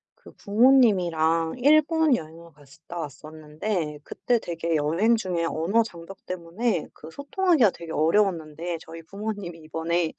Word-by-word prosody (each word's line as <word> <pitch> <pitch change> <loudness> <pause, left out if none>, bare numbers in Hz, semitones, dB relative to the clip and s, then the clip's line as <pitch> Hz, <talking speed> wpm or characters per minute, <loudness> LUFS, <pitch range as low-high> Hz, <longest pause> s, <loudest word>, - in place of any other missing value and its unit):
그 - - -16
부모님이랑 185 -9 +3
일본 310 +1 +4
여행을 165 -1 -9
갔었다 150 +4 -13
왔었는데 155 - -5
그때 240 +8 -1
되게 165 -2 -3
여행 165 +10 +2
중에 180 -6 -2
언어 175 +9 +1
장벽 180 -2 -12
때문에 180 +2 -2
그 155 +2 -12
소통하기가 285 - +2
되게 170 -1 -10
어려웠는데 165 -1 0
저희 165 +1 -10
부모님이 200 -3 -6
이번에 165 +1 -2
170 Hz, 325 characters per minute, -25 LUFS, 160-215 Hz, -, 일본